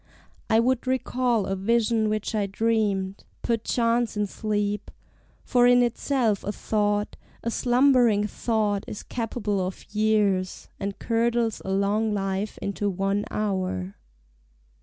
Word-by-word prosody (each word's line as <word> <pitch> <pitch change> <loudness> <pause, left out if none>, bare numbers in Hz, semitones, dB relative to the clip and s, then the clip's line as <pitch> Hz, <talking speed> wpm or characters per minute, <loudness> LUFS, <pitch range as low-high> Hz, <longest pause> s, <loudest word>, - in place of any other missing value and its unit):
I 220 - +5
would 255 +2 +1
recall 250 -3 +1
a 195 - -1
vision 220 +2 +1
which 215 +1 -2
I 210 -2 0
dreamed 200 -2 0 0.2
Perchance 230 0 0
in 210 - +1
sleep, 205 0 -2 0.5
for 245 -1 +4
in 245 0 +6
itself 240 -3 0
a 205 - -2
thought, 210 -1 -1 0.3
A 230 - -1
slumbering 245 -4 +3
thought, 210 -2 -1
is 205 - -7
capable 220 -4 -2
of 185 +1 -6
years, 210 -3 +1
And 200 0 -4
curdles 230 -1 0
a - - -6
long 205 +3 +1
life 195 +1 -2
into 200 +1 -1
one 195 +2 -1
hour. 185 - -2
215 Hz, 125 wpm, -25 LUFS, 200-230 Hz, 0.5 s, in